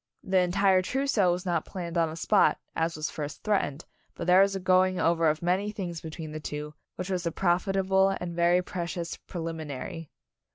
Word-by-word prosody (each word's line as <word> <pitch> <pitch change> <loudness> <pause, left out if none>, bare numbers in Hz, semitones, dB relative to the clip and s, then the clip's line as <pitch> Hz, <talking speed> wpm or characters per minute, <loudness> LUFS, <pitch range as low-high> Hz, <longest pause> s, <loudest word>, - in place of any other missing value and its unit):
The 190 0 +2
entire 185 +1 +3
trousseau 235 -4 +1
was 180 +2 -3
not 170 -3 0
planned 175 -3 -6
on 165 -1 +2
the 155 - -6
spot, 195 +4 +3 0.2
as 165 +1 0
was 155 0 -3
first 150 -1 -6
threatened, 170 -8 0 0.3
but - - -5
there 180 +2 +6
was 195 0 +3
a - - -2
going 185 0 +3
over 165 -1 +3
of 155 +2 -2
many 185 +4 +1
things 175 -6 -5
between 160 -1 -7
the 155 - -5
two, 150 0 -6 0.2
which 185 +1 -5
was 180 -2 -1
a - - 0
profitable 190 +2 +2
and 170 -1 -5
very 175 +1 +3
precious 170 -1 -4
prelimi 165 -2 -6
nary. 145 +3 -6
175 Hz, 195 wpm, -28 LUFS, 165-190 Hz, 0.3 s, there